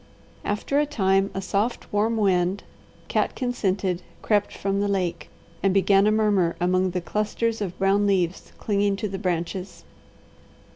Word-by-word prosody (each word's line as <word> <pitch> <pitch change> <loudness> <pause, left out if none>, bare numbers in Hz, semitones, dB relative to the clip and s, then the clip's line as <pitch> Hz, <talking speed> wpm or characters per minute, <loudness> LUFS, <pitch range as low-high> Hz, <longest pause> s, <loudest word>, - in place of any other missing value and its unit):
After 210 +7 0
a 295 - +1
time 195 -7 +2
a 195 - -3
soft, 205 +6 -2
warm 220 +2 +1
wind, 190 -2 +1 0.4
catkin 250 -2 -1
scented, 190 -5 -1 0.2
crept 205 -2 +2
from 195 0 -2
the 205 - +1
lake, 175 -5 -2 0.3
and 195 -1 +2
began 195 +1 +4
a - - +4
murmur 205 -6 +2
among 185 +1 +2
the 180 0 -2
clusters 215 +4 -1
of 185 -3 -4
brown 200 +1 +2
leaves 185 -3 0
clinging 200 -1 +1
to 210 +2 -3
the 195 -1 -5
branches. 180 +1 -3
195 Hz, 150 wpm, -24 LUFS, 185-210 Hz, 0.4 s, began